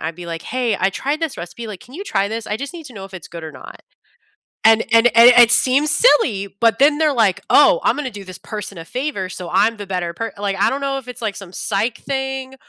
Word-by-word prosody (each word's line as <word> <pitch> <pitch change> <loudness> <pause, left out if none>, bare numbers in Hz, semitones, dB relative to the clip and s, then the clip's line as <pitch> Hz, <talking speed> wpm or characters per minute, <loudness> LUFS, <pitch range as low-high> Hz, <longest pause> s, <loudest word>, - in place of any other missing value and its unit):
I'd 160 +1 -4
be 175 -1 -9
like, 165 -1 -6
"Hey, 245 -4 -1
I 190 - +1
tried 285 +9 -3
this 325 -4 -3
recipe, 175 +7 -8
like, 210 -4 -8
can 250 - -16
you 390 +5 -7
try 200 - -1
this? 220 0 -5
I 210 - -2
just 280 +6 -6
need 330 -2 -9
to 260 - -12
know 195 -2 -8
if 195 - -15
it's 180 - -9
good 170 -1 -9
or 160 - -7
not." 130 - -12 0.8
And 225 0 +5
and 230 +1 +5
a 230 - 0
and 235 +1 +10
it 235 - +4
seems 275 +5 +3
silly, 230 - +2
but 230 -2 +3
then 290 +2 +4
they're 310 -2 +2
like, 220 -7 +1
"Oh, - - +5
I'm - - +2
gonna 295 -3 -3
do 205 -1 -9
this 185 -1 -10
person 210 -3 -7
a 165 - -8
favor 250 - -4
so 180 -1 -8
I'm 225 +2 +2
the 205 - -7
better 180 -3 -3
per" 225 +4 -5
like, 200 -1 -2
I - - +3
don't 275 - -3
know 275 -1 -2
if 255 -2 -11
it's 250 -1 -8
like 215 -3 -2
some 195 -3 -10
psych 210 +3 -2
thing 265 -1 -4
225 Hz, 270 wpm, -19 LUFS, 195-265 Hz, 0.8 s, and